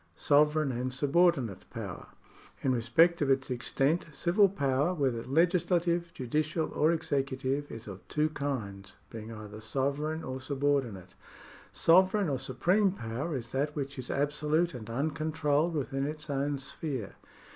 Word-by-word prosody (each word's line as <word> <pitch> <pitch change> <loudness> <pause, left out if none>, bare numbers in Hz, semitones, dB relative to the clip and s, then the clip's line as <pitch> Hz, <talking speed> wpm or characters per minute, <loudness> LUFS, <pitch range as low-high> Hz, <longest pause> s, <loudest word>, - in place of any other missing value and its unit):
Sovereigri 150 - +3
and 130 0 -2
subordinate 135 - +2
poiver. - - -7 0.3
— - - -24
In 130 - +2
respect 155 +9 +3
of 145 - +1
its 135 -1 +1
extent 135 +7 0
civil 185 +7 +3
power, 145 -1 0
whether 130 -7 0
legislative, 170 +3 +1
judicial, 155 +5 -1
or 155 +2 +3
executive, 140 -2 -1
is 115 0 -8
of 100 -2 -9
two 155 +1 +1
kinds, 110 -10 -4 0.2
being 110 0 -7
either 110 -1 -9
sovereign 140 +7 -2
or 130 0 -5
subordinate. 135 -8 -1 0.6
Sovereign 185 +2 +4
or 135 -3 -1
supreme 180 - +2
power 130 - -4
is 115 -2 -7
that 145 +3 -1
which 140 -2 -4
is 125 - -5
absolute 150 +4 +1
and 115 -3 -8
uncontrolled 155 +4 0
within 135 -1 -1
its 150 0 -5
own 140 +1 0
sphere. 135 -4 -5
140 Hz, 140 wpm, -30 LUFS, 130-160 Hz, 0.6 s, Sovereign